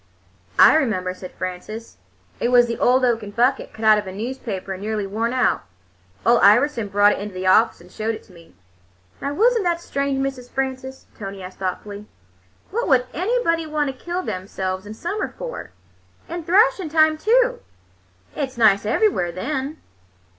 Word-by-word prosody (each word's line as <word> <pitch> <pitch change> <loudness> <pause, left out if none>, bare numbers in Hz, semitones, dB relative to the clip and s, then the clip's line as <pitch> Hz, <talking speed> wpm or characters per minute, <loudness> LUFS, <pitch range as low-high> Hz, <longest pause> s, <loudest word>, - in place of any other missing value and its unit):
"I - - +8
remember," 185 -10 0
said 185 0 -10
Frances. 185 +5 -7 0.4
"It 240 - 0
was 245 -1 +6
'The 235 -1 -4
Old 255 +1 +4
Oaken 225 -4 0
Bucket,' 245 +6 +1
cut 220 - -6
out 215 -1 +6
of 205 - -7
a - - -5
newspaper 205 -3 -5
and 190 - -8
nearly 210 -1 -2
worn 220 +4 -2
out. 255 -3 +1 0.6
Ole 235 +1 +5
Iverson 230 +2 +4
brought 205 +1 +4
it - - -2
into 205 -1 -7
the 185 0 -4
office 220 +5 +4
and 180 +1 -17
showed 220 +1 -2
it - - -12
to 185 - -20
me." 170 -1 -18 0.7
"Now, 280 +1 -3
was 480 +7 +4
n't 450 - +1
that 345 -1 0
strange, 280 -4 -2
Miss 270 -2 -3
Frances?" 265 0 -4
Tony 195 -2 -7
asked 185 +1 -10
thoughtfully. 200 +2 -5 0.6
"What 470 +4 -1
would 255 -4 +4
anybody 345 - 0
want 295 -3 -1
to - - -23
kill 350 +1 -2
themselves 185 - -4
in 215 - -8
summer 345 - -4
for? - - -6 0.6
In 340 -1 -6
thrashing 395 0 +3
time, 315 0 +4
too! 485 +7 +2 0.8
It's 265 -4 -4
nice 210 -3 +4
everywhere 290 - +1
then." 270 - -3
245 Hz, 175 wpm, -22 LUFS, 205-310 Hz, 0.8 s, I